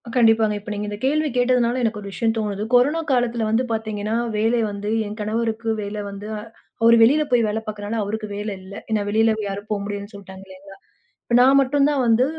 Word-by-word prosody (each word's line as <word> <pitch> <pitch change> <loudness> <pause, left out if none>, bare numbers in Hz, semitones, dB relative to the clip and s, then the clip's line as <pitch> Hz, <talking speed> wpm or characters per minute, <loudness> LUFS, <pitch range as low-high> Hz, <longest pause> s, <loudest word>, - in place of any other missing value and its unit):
கண்டிப்பாங்க. 225 -3 +4
இப்ப 210 +2 -10
நீங்க 210 0 -4
இந்த 205 - -5
கேள்வி 305 +2 +1
கேட்டதுனால, 245 0 +2
எனக்கு 220 -2 -1
ஒரு 200 - -7
விஷயம் 225 +1 0
தோணுது. 210 -2 -2
கொரோனா 285 +7 +4
காலத்துல 240 -2 +1
வந்து 225 +3 +2
பாத்தீங்கன்னா, 215 -1 -2 0.2
வேலை 225 +3 +2
வந்து 205 +1 -5 0.2
என் 210 +2 -7
கணவருக்கு 225 +1 -2
வேல 205 +1 -5
வந்து 200 +1 -8
அ - - -5 0.4
அவரு 230 +1 +7
வெளியில 285 +7 +5
போய் 240 -2 +4
வேல 210 +1 -1
பாக்கிறனால, 210 +1 -4
அவருக்கு 215 +1 -4
வேல 210 +1 -4
இல்ல. 190 +1 -11 0.2
ஏன்னா 215 -1 +1
வெளியில 220 +1 +3
யாரும் 200 +2 -6
போ 215 - 0
முடியாதுன்னு 205 0 -6
சொல்லிட்டாங்க 195 -1 -11
இல்லைங்களா? 195 +1 -14 0.6
நான் 265 +2 +6
மட்டும்தான் 280 +1 +2
வந்து 230 +2 +4
220 Hz, 190 wpm, -22 LUFS, 205-240 Hz, 0.6 s, அவரு